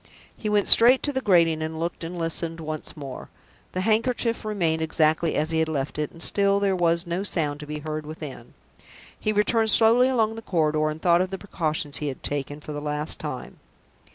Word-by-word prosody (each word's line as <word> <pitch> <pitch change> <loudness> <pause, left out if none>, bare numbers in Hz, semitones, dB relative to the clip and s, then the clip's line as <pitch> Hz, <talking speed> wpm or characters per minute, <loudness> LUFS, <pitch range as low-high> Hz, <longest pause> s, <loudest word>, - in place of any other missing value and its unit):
He 215 - -4
went 210 -1 +2
straight 245 +3 +6
to 290 - -1
the 265 - -1
grating, 170 -7 +3
and 160 0 -4
looked 170 +1 -4
and 170 +2 -6
listened 165 0 -2
once 155 -1 -6
more. 135 -3 -8 0.4
The 185 - -2
handkerchief 230 +3 0
remained 175 -7 -1
exactly 160 0 +1
as 155 +2 0
he 160 - +1
had 160 0 +1
left 145 -1 -3
it, 150 - -1
and 165 - -4
still 200 0 +4
there 200 -1 +1
was 170 0 +1
no 170 +2 -2
sound 155 -7 -1
to 150 - -9
be 150 0 -5
heard 155 -1 -4
within. 150 -6 -9 0.6
He 215 - 0
returned 220 +2 +2
slowly 230 +4 +5
along 225 -4 +1
the 225 - -8
corridor, 155 -6 0
and 155 +1 -5
thought 170 +1 +3
of 185 - -1
the 190 - -5
precautions 155 -7 -2
he 150 - -3
had 135 - -6
taken, 145 +1 -1
for 150 - -8
the 145 0 -5
last 150 +1 -1
time. - - -7
165 Hz, 210 wpm, -24 LUFS, 155-205 Hz, 0.6 s, straight